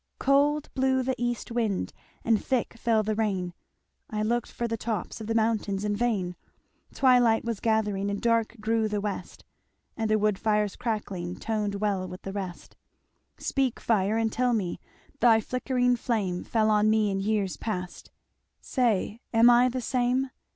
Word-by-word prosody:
"Cold 285 +2 +2
blew 260 -1 +2
the 260 +1 0
east 240 0 -2
wind 225 -5 -1 0.3
And 225 -2 +2
thick 255 -3 0
fell 230 -2 +1
the 215 +1 -1
rain, 195 -5 -1 0.6
I 215 -1 -2
looked 235 +2 -1
for 235 - -3
the 230 - -2
tops 220 -1 -4
Of 215 - -6
the 225 - -1
mountains 215 -3 0
in 205 0 0
vain; 205 -6 -1 0.6
Twilight 245 -4 +4
was 230 -3 -2
gathering 210 -3 0
And 200 0 -2
dark 230 -1 +1
grew 220 +1 +1
the 210 -1 -1
west, 205 -1 -5 0.5
And 225 -1 -2
the 215 - +4
woodfire's 210 0 +1
crackling 195 -6 -3
Toned 210 -2 -2
well 200 -2 -1
with 180 0 -9
the 195 - -5
rest. 190 -3 -6 0.6
"Speak 265 -4 -1
fire 215 -1 +1
and 225 -1 +1
tell 250 0 +1
me 190 -6 -2 0.4
Thy 230 -1 +6
flickering 250 +1 0
flame 205 -8 -1
Fell 220 -1 +1
on 210 0 +4
me 215 -1 +2
in 195 - -1
years 200 -2 0
past 180 -5 -5 0.5
Say, 230 -3 0
am 230 +1 +6
I 245 +1 +5
the 255 +1 -3
same? 255 +2 0
220 Hz, 165 wpm, -27 LUFS, 205-240 Hz, 0.6 s, Thy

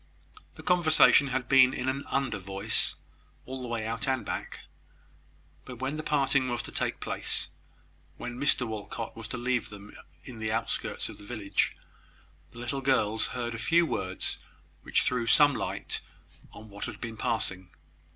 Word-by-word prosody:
The - - -11
conversation 160 -5 +6
had 130 -1 -2
been 130 -1 +6
in 130 - -3
an 135 +2 -1
under 130 -6 -1
voice, 95 +1 +2 0.5
all 130 0 -6
the 125 - -5
way 115 -2 -2
out 115 +3 -3
and 130 -2 0
back; - - -5 1.0
but, 125 - -9
when 130 +4 -2
the 155 - -3
parting 140 -3 +2
was 120 0 -1
to - - -8
take - - -2
place, - - -1 0.7
when 120 - -5
Mr 130 0 +2
Walcot 110 +1 -5
was 115 -1 -6
to 125 - -4
leave 125 -1 0
them 105 0 -11 0.3
in 120 -4 -10
the 110 0 -2
outskirts 115 +1 -1
of - - -8
the - - -12
village, 105 -2 -1 0.7
the - - -16
little 120 +3 -3
girls 110 -5 +2
heard 120 -2 -3
a 115 - -5
few 170 +8 +4
words, 95 - -2 0.4
which - - +1
threw 125 -2 +1
some 145 +4 +6
light - - -3 0.5
on 110 - -12
what 100 -1 -6
had - - -7
been 115 -2 -5
passing. 100 -6 -1
120 Hz, 170 wpm, -29 LUFS, 110-130 Hz, 1.0 s, conversation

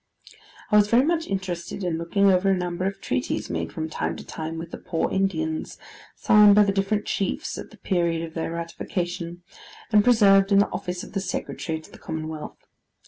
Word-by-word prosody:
I 210 - +6
was 205 -1 +5
very 235 +5 +4
much 330 0 0
interested 190 -1 -4
in 170 -3 -1
looking 195 +4 +3
over 185 +1 +3
a 190 - +3
number 180 0 -2
of 195 0 -4
treaties 255 - -2
made - - -3
from 160 -2 -4
time 155 - -3
to - - -9
time 160 +1 -5
with 165 +1 -7
the - - -7
poor 165 - -2
Indians, 160 -5 -1 0.4
signed 210 -1 +6
by 210 - +7
the 200 - +2
different 195 +2 0
chiefs 195 - -2
at - - -8
the - - -16
period 170 -3 0
of 165 -1 -7
their 165 0 -3
ratification, 170 +1 -4 0.5
and 210 -2 +6
preserved 200 -4 +5
in 200 - +6
the 200 - +4
office 180 -1 -4
of - - -11
the 195 - -1
Secretary 180 -3 -4
to 160 - -16
the - - -14
Commonwealth. 155 -1 -6
185 Hz, 195 wpm, -25 LUFS, 165-200 Hz, 0.5 s, by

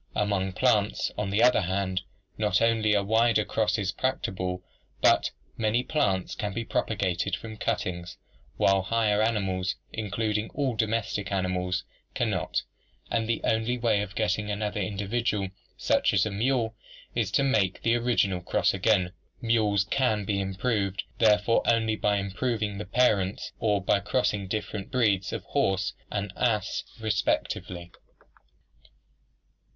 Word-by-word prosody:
Among 100 -2 0
plants, 105 -2 +2
on 105 -1 -2
the 105 +4 +2
other 125 -2 +5
hand, 95 0 -1 0.3
not 105 -3 +2
only 110 -2 +3
are 100 - +2
wider 110 +1 +3
crosses 105 -3 0
practicable 95 -8 -2 0.4
but - - +4 0.3
many 115 +2 +1
plants 100 - 0
can 105 -1 -3
be 115 +2 -3
propagated 95 -7 -1
from 110 -1 -8
cuttings, 90 -3 -3 0.4
while 95 0 +4
higher 105 +1 +1
animals, 95 -5 0 0.2
including 110 0 -1
all 135 -5 0
domestic 110 -3 -1
animals, 90 -1 -1 0.3
can - - +1
not, - - -1 0.5
and 115 -1 0
the 115 - 0
only 115 +2 +1
way 115 -4 +2
of 105 0 -6
getting 105 -1 0
another 105 0 -2
individual 100 +1 -1 0.3
such - - +2
as - - +4
a 110 - -2
mule 115 +2 0 0.4
is 115 -5 0
to 140 - +3
make 110 -9 +1
the 115 - +3
original 115 -6 +1
cross 90 0 +1
again. 95 -2 +2 0.3
Mules 110 -4 +2
can 110 -1 0
be 100 0 0
improved 100 -1 -1 0.2
therefore 105 +1 +4
only 110 -2 +3
by 105 -1 +1
improving 105 +1 -2
the 105 - -4
parents 100 -3 +1
or 105 -2 +2
by 100 - +3
crossing 105 -2 0
different 105 0 -4
breeds 105 -7 +1
of - - -4
the - - -27
horse 95 -1 +1 0.2
and 100 -1 -3
ass 110 -4 0 0.2
respectively. 95 -4 -1
105 Hz, 140 wpm, -27 LUFS, 95-115 Hz, 0.5 s, other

